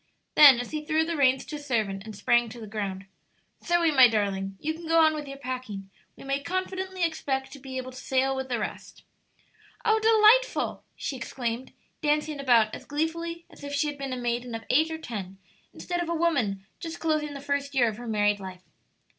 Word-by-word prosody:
Then, 280 -5 +9
as 245 - -5
he 305 -1 -3
threw 315 +1 +1
the 335 0 -2
reins 265 -3 +3
to 300 - -6
a - - -9
servant 220 -9 -1
and 220 -1 -8
sprang 240 +3 +2
to 240 +2 -10
the 220 - -7
ground, 200 -3 -4 0.6
"Zoe, 345 -2 +3
my 260 -4 +8
darling, 195 -3 -1
you 315 +1 -2
can 330 +1 -9
go 330 0 +4
on 315 -1 +5
with 300 -2 -5
your 275 0 -7
packing; 250 -7 -6 0.2
we - - -13
may 275 +1 -1
confidently 370 +2 -3
expect 270 -5 -1
to 280 - -10
be 260 -1 -7
able 255 0 -5
to 255 - -12
sail 265 +1 +1
with 265 0 -4
the 245 - 0
rest." 215 - -6 0.8
"Oh 440 0 +4
delightful!" 445 +3 +4
she 275 - -4
exclaimed, 240 +1 -4 0.3
dancing 300 -1 0
about 235 -5 +4
as - - -8
gleefully 335 +3 -3
as - - -15
if 285 0 -4
she 285 - +1
had 290 -1 -4
been 275 -1 -4
a 255 - -2
maiden 240 0 -2
of 225 - -6
eight 315 +5 +4
or 320 - -4
ten 200 -10 -6 0.3
instead 350 -1 -3
of 340 - -3
a 335 - 0
woman 250 - 0
just 330 -1 -6
closing 305 -2 -1
the - - -5
first 280 0 -2
year 245 -3 +4
of 215 -2 -3
her 240 0 -8
married 205 -2 +2
life. 185 -1 -9
275 Hz, 215 wpm, -27 LUFS, 230-315 Hz, 0.8 s, Then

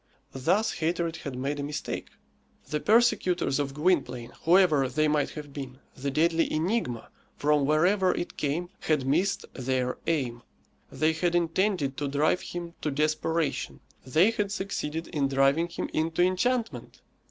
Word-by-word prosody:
Thus 190 +12 +1
hatred 170 0 -1
had 140 -4 -6
made 140 +3 -2
a - - -2
mistake. 145 0 -4 0.6
The 150 - -1
persecutors 210 - +2
of 140 -1 -2
Gwynplaine, 140 -8 0
whoever 165 -6 +5
they 155 +4 +1
might 150 -1 +1
have 145 -2 -8
been 135 -2 -7 0.2
the 140 +1 -4
deadly 165 +3 +2
enigma, 155 - -1 0.3
from 145 -1 +2
wherever 180 +5 +3
it 175 - -4
came 155 +5 -2
had 150 -4 0
missed 175 +9 +1
their 130 -1 -1
aim. 130 -7 -1 0.5
They 155 +1 +1
had 175 +2 0
intended 170 -4 +1
to 145 - -2
drive 145 +5 +1
him 170 -1 -6
to 155 - -1
desperation; 155 +2 -1 0.2
they 160 - +4
had 210 -3 -2
succeeded 165 -5 -3
in 140 -2 0
driving 135 +5 +3
him 170 - -4
into 165 +2 +1
enchantment. 230 +6 -1
155 Hz, 145 wpm, -27 LUFS, 140-175 Hz, 0.6 s, whoever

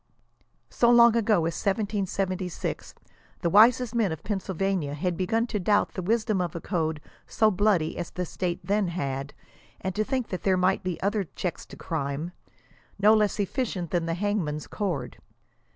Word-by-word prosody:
So 235 - +3
long 235 -1 +7
ago 225 -2 +3
as 165 - -1
1776, 195 -3 -2 0.5
the 170 - 0
wisest 230 +3 +5
men 225 -6 +1
of 160 - -6
Pennsylvania 190 -6 -2
had 175 +4 -1
be 185 +1 -2
gun 225 +3 +1
to 220 -3 -3
doubt 205 +3 +2
the 185 - -4
wisdom 215 0 +1
of 175 -2 -3
a - - -3
code 160 -4 -2 0.3
so 220 -1 +3
bloody 190 -5 +2
as 175 - -4
the 180 - -4
State 175 +1 -3
then 205 -1 +1
had, 140 -5 -4 0.4
and 190 - -3
to 215 +3 0
think 255 0 -2
there 185 0 0
might 185 +1 +2
be 185 -2 -3
other 200 0 0
checks 180 - -4
to - - -11
crime, 155 0 -3 0.7
no 205 +2 +6
less 210 -1 +2
efficient 200 - -2
than 170 -2 0
the 165 - -1
hangman's 175 -6 -1
cord. 185 -9 -4
190 Hz, 170 wpm, -26 LUFS, 170-215 Hz, 0.7 s, long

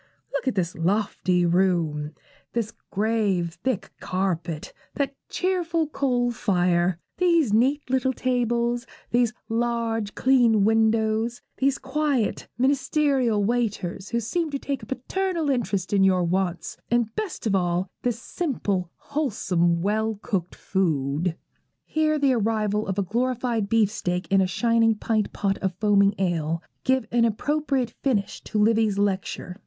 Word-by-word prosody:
Look 280 - -2
at 260 - +1
this 175 -3 0
lofty 180 0 +1
room; 170 -4 +1 0.4
this 230 -2 -2 0.2
grave 200 -5 0
thick 255 -7 -1
carpet; 170 -4 -2 0.2
that 280 -1 -1 0.2
cheerful 345 -3 0
coal 245 -5 +1
fire; 180 -5 +1 0.2
these 335 - +3
neat 265 +7 +2
little 260 0 +1
tables; 240 -1 0 0.2
these 240 -1 +3 0.2
large, 230 -2 -1
clean 240 -5 +4
windows; 220 +1 +2
these 270 0 +2
quiet, 270 -4 -1
ministerial 265 -4 +2
waiters, 205 -4 -1
who 235 - 0
seem 315 +9 -1
to 285 - -2
take 275 -1 -4
a - - -10
paternal 330 +4 -1
interest 205 -7 -1
in 195 -1 +4
your 185 -2 +4
wants, 180 0 -1
and 235 -2 +1
best 420 - -4
of 215 - +1
all 175 -1 +1
in 190 - -7
this 240 -2 -1
simple, 205 - -2
wholesome, 180 - 0
well 220 +2 0
cooked 185 -7 -2
food.' 160 -2 0 0.5
Here 310 0 +1
the 280 -3 +3
arrival 215 -2 0
of 190 0 -2
a 200 - +2
glorified 235 0 -1
beefsteak 200 -5 +1
and 195 0 +5
a 190 - +2
shining 230 +3 +2
pint 215 0 -1
pot 195 -1 -1
of 190 -2 -2
foaming 200 0 +3
ale 165 -3 -1 0.2
give 260 -2 +2
an 235 -1 +3
appropriate 270 +2 0
finish 220 -8 -1
to - - -3
Livy's 215 -1 +3
lecture. 190 -2 -1
220 Hz, 140 wpm, -25 LUFS, 190-255 Hz, 0.5 s, and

